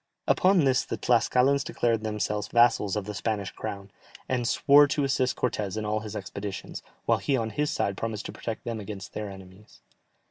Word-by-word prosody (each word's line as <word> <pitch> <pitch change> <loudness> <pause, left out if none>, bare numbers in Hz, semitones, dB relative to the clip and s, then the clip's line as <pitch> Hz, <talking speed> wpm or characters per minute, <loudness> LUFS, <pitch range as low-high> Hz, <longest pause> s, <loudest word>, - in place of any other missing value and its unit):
Upon 185 -3 +4
this 130 -2 +3
the - - -4
Tlascalans 125 +3 +3
declared 115 -5 0
themselves 105 -1 -2
vassals 120 -4 +3
of 105 -2 -2
the 105 - -5
Spanish 100 -1 -2
crown, 100 -1 -6 0.4
and 125 -2 0
swore 145 +3 +6
to 145 0 0
assist 130 -2 +1
Cortès 105 -5 -2
in 110 - -2
all 105 +1 0
his 110 0 -7
expeditions, 100 0 -6 0.2
while - - +3
he 140 - +1
on 110 -2 -2
his 150 +4 0
side 100 -10 -1
promised 110 -2 -4
to - - -5
protect 115 -2 -6
them 115 -2 -4
against 100 -2 -8
their 105 -1 -4
enemies. 95 +1 -14
110 Hz, 185 wpm, -27 LUFS, 105-125 Hz, 0.4 s, swore